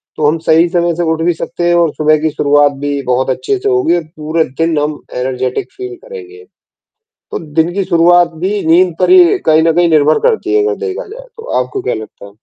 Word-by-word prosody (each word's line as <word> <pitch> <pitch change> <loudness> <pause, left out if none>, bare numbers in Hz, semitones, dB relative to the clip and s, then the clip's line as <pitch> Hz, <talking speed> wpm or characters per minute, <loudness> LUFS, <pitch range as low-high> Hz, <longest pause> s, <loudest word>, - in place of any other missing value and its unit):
तो 150 - 0
हम 160 +2 +1
सही 165 +2 +4
समय 170 -1 0
से 175 - -2
उठ 160 0 -2
भी 175 +1 +1
सकते 175 +1 -4
हैं 175 - +2
और 170 -3 +2
सुबह 155 0 +2
की 160 - +1
शुरुआत 145 -1 +2
भी 145 -1 -2
बहुत 125 +1 -1
अच्छे 400 - -1
से 410 +2 -2
होगी 385 - +1
और 170 - -4
पूरे 155 +1 -1 0.2
दिन 165 -1 +1
हम 150 0 -3 0.2
एनर्जेटिक 125 0 -3
फ़ील 380 -1 -8
करेंगे। 435 -3 -11 0.9
तो - - -4 0.2
दिन 165 +3 +1
की 200 -1 -1
शुरुआत 175 0 +3
भी 205 +2 -1
नींद 175 +2 +3
पर - - +1
ही 370 +1 +5
कहीं 155 0 +4
न 165 - +2
कहीं 175 -1 +3
निर्भर 155 0 +3
करती 410 -4 -1
है 420 - +3
अगर 435 +1 0
देखा 390 -2 -5
जाए - - -11
तो, 455 - -11 0.2
आपको 395 - -6
क्या - - -2
लगता 110 -2 -10
है? 100 - -15
170 Hz, 225 wpm, -13 LUFS, -, 0.9 s, ही